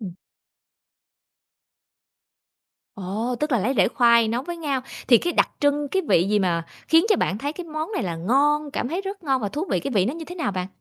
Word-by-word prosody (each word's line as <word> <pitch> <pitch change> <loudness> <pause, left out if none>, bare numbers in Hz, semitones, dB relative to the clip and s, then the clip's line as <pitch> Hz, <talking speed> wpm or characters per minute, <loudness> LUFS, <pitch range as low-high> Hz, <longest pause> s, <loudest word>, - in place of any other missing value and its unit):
Ừm. 190 -5 -7 2.8
Ồ, 210 +5 -3
tức 300 -1 -1
là 245 - +3
lấy 225 +7 0
rễ 200 - +4
khoai 235 -2 +4
nấu 235 +3 -1
với 345 +4 -6
ngao. 285 -5 -2 0.3
Thì 240 -3 +7
cái 350 - -2
đặc - - +2
trưng, 290 0 +1
cái 380 +6 0
vị 170 - +4
gì 210 0 +2
mà 170 -4 0 0.2
khiến 325 +1 +5
cho 420 - +5
bạn 195 - -1
thấy 285 +5 -3
cái 350 +2 -8
món 315 +4 -5
này - - -1
là 175 -4 -3
ngon, 285 - +1
cảm 245 - -3
thấy 340 +6 -2
rất 395 0 -7
ngon 270 -4 0
và 205 - -1
thú 295 - -3
vị, - - +1
cái 275 - -4
vị 200 -7 +2
nó 245 +8 -2
như 330 0 -7
thế 355 - -9
nào 310 - -2
bạn? 185 -1 -3
270 Hz, 230 wpm, -23 LUFS, 210-310 Hz, 2.8 s, Thì